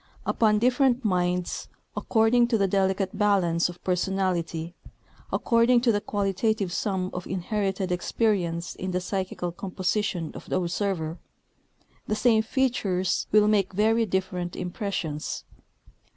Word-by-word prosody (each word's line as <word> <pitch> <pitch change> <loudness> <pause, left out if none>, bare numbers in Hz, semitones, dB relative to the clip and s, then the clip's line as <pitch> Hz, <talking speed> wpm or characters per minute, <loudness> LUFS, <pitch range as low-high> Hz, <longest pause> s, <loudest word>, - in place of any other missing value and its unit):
Upon 215 -2 +3
different 250 +1 +2
minds, 180 -2 0 0.3
according 235 +1 +3
to 235 -2 +2
the 200 -2 +2
delicate 190 0 0
balance 180 -5 +2
of 175 - -11
personality, 180 -3 -1 0.6
according 235 +1 +3
to 240 -1 +3
the 205 -1 0
qualitative 200 -1 -1
sum 190 -3 -1
of 180 0 -5
inherited 190 0 -2
experience 180 -2 0
in 185 - -5
the 180 0 0
psychical 185 -1 -3
composition 185 -1 -2
of - - -10
the - - +1
observer, 175 -2 -2 0.9
the 215 - 0
same 225 -1 +4
features 220 -7 0
will 210 0 +5
make 200 -2 +2
very 220 +3 +2
different 180 -2 -2
impressions. 180 -4 -3
195 Hz, 125 wpm, -26 LUFS, 180-215 Hz, 0.9 s, will